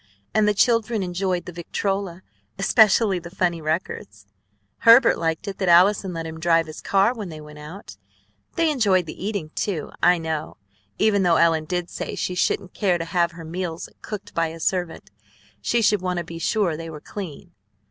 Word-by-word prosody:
And 215 -1 +3
the 210 - +2
children 230 -1 +2
enjoyed 180 0 -2
the - - -7
victrola, 185 +1 -3 0.3
especially 200 -1 +4
the 175 0 -10
funny 175 -2 -1
records. 155 - -4 0.5
Herbert 230 +2 +7
liked 165 +4 -2
it 195 - -5
that 190 - +1
Allison 185 +2 +5
let 165 -1 -5
him 160 0 -7
drive 165 0 +3
his 155 0 -9
car 200 +4 +2
when 215 -6 -6
they 155 -1 -8
went 150 0 -12
out. 150 - -10 0.6
They 330 -2 +2
enjoyed 200 - +2
the 160 - -8
eating, 200 -7 -3
too, 180 -7 -3
I 180 - +5
know, 160 -2 -4 0.4
even 210 -2 +3
though 175 -3 +4
Ellen 165 -1 +3
did 175 +1 -2
say - - -5
she 180 - -2
shouldn't 180 +1 -1
care 185 -4 +1
to 165 - -4
have 170 0 0
her 165 -1 -10
meals 170 0 -5
cooked 205 -1 -7
by 165 -1 +1
a 165 +1 -8
servant; 175 - -2 0.5
she 235 - +1
should 210 -2 +3
want 180 -1 -2
to 175 - -1
be 165 0 -8
sure 190 -2 +1
they 165 +1 -7
were 155 -2 -8
clean." 180 -1 -8
180 Hz, 190 wpm, -23 LUFS, 165-200 Hz, 0.6 s, Herbert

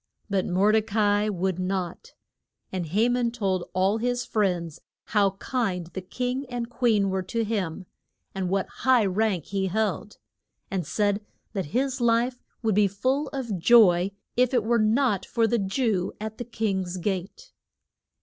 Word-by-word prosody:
But 195 -2 +1
Mor 195 +3 +3
de 220 0 +4
ca 210 -1 +1
i - - 0
would 190 -2 -1
not. 185 - -3 0.6
And 180 -3 -3
Ha 210 +9 +2
man 245 -1 +1
told 195 -6 -2
all 190 +4 +1
his 245 +1 -1
friends 180 -7 -1 0.3
how 200 -2 +3
kind 195 -8 -2
the 190 - -4
king 250 +8 -3
and 240 -1 -4
queen 220 -6 +2
were 190 0 0
to 230 +5 -2
him, 195 -5 -2 0.5
and 190 -2 -2
what 195 0 0
high 255 -4 +4
rank 195 -3 0
he 195 -1 -1
held, 210 +1 -2 0.5
and 180 -5 -2
said 205 0 0 0.3
that 195 -3 -2
his 260 - -1
life 240 +2 +2 0.2
would 220 -1 +2
be 205 +1 +4
full 260 +9 0
of 240 -9 -4
joy 185 -3 +6 0.3
if 250 +1 +2
it 235 - +3
were 235 +2 +2
not 215 -2 +2
for 230 -1 +1
the 230 +1 +1
Jew 195 -2 0
at 220 0 -6
the 245 - -4
king's 190 -6 -2
gate. 195 - -4
210 Hz, 165 wpm, -26 LUFS, 190-235 Hz, 0.6 s, joy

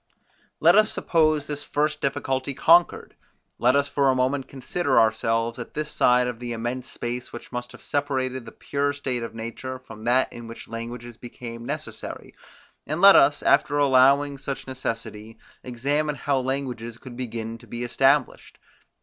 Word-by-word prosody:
Let - - +6
us 215 0 +5
suppose 155 -3 +1
this 145 -1 -5
first 150 +1 -1
difficulty 135 0 -2
conquered: 170 +4 +3 0.4
Let 125 +2 +4
us 140 0 +2
for 140 -1 +2
a 130 - +3
moment 130 +1 0
consider 140 +3 0
ourselves 115 +1 +1
at 120 - -8
this 150 0 -3
side 125 0 +3
of 125 -2 -4
the 120 -1 -4
immense 120 +3 -4
space, 120 +1 -5
which 120 - -10
must 120 -1 -5
have - - -14
separated 130 -3 -2
the - - -8
pure 145 0 -2
state 130 -4 -3
of 115 -1 -6
nature 115 +3 -6
from 115 -4 -12
that 125 +2 +2
in 120 -1 -9
which 115 - -10
languages 115 +1 -7
became 120 -1 -9
necessary, - - -6 0.5
and 155 +3 -2
let 195 +1 +9
us, 145 +1 +5
after 145 +1 +3
allowing 140 +1 +4
such 135 -1 -5
necessity, 115 -4 -6 0.3
examine 145 +5 -1
how 140 0 0
languages 125 -3 -3
could 120 0 -11
begin 115 -2 -5
to - - -17
be 120 +1 -5
established. 135 +3 +1
130 Hz, 165 wpm, -24 LUFS, 120-140 Hz, 0.5 s, let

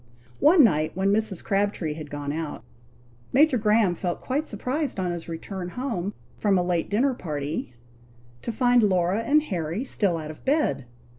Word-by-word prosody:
One 310 +1 +7
night, 155 -8 +2
when 195 +1 +2
Mrs. 215 -4 0
Crabtree 195 -6 0
had 155 -1 -8
gone 145 0 -4
out, 160 -1 -5 0.7
Major 275 -1 +5
Graham 210 -3 +3
felt 175 0 -3
quite 290 +4 -2
surprised 255 +3 -2
on 180 -1 0
his 170 -1 -6
return 175 +2 -5
home 210 -4 -3 0.2
from 200 -3 +3
a 180 - +2
late 175 -2 -1
dinner 255 +6 +2
party, 150 - -4 0.7
to - - -3
find 245 +1 +3
Laura 185 -1 +2
and 295 +6 +3
Harry 175 - -3
still 200 -9 +1
out 155 -1 -5
of 155 - -14
bed. 280 - +1
195 Hz, 165 wpm, -25 LUFS, 165-245 Hz, 0.7 s, One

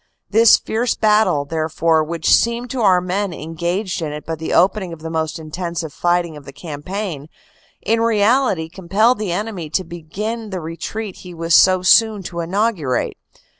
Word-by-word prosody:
This 225 +2 +7
fierce 230 +2 -1
battle, 210 -9 +2
therefore, 160 +1 +1
which 165 +1 +1
seemed 235 +1 +1
to 260 - -2
our 185 -4 +4
men 185 +1 -2
engaged 170 +5 -3
in 155 -2 -3
it 150 0 -7
but 160 -1 -4
the 160 - -4
opening 190 0 +2
of 160 - -11
the 160 - -5
most 160 0 -2
intensive 165 -1 -5
fighting 175 -2 0
of 150 - -11
the 140 - -10
campaign, 155 +2 -6 0.5
in 225 +2 +1
reality 225 -5 +2
compelled 195 +8 +1
the 210 -4 -2
enemy 185 -4 -4
to 155 +5 0
begin 205 +7 -5
the 190 -2 -4
retreat 180 +5 -6
he 180 -2 -11
was 165 0 -1
so 185 +1 +6
soon 215 +1 +4
to 170 -1 -6
inaugurate. 175 - -1
175 Hz, 170 wpm, -19 LUFS, 160-210 Hz, 0.5 s, This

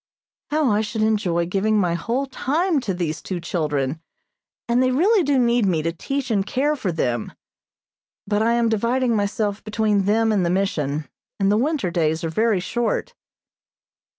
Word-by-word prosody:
How 300 -5 +2
I 210 +1 +2
should 215 0 -2
enjoy 190 -6 +1
giving 200 +5 +1
my 180 -4 +2
whole 235 +11 -1
time 300 +5 0
to 225 -7 -3
these 165 -3 -3
two 185 -2 -4
children, 155 -4 -2 0.7
and 240 +1 +2
they 255 - +3
really 375 - +3
do 285 -4 +1
need 240 -3 +3
me 165 -4 +1
to 165 - 0
teach 265 +8 -3
and 200 -3 +2
care 275 +8 0
for 205 -10 -2
them; 120 -8 -2 0.9
but 205 +1 0
I 230 +1 +3
am 235 -1 +2
dividing 235 +2 +1
myself 205 0 -1
between 210 -2 +1
them 220 +2 +2
and 200 -4 +2
the 170 - +1
Mission, 155 -6 -1 0.3
and 195 0 +2
the - - +3
winter 255 - 0
days 160 -1 0
are 165 - -1
very 215 +4 +1
short. 240 - -2
210 Hz, 175 wpm, -22 LUFS, 175-245 Hz, 0.9 s, they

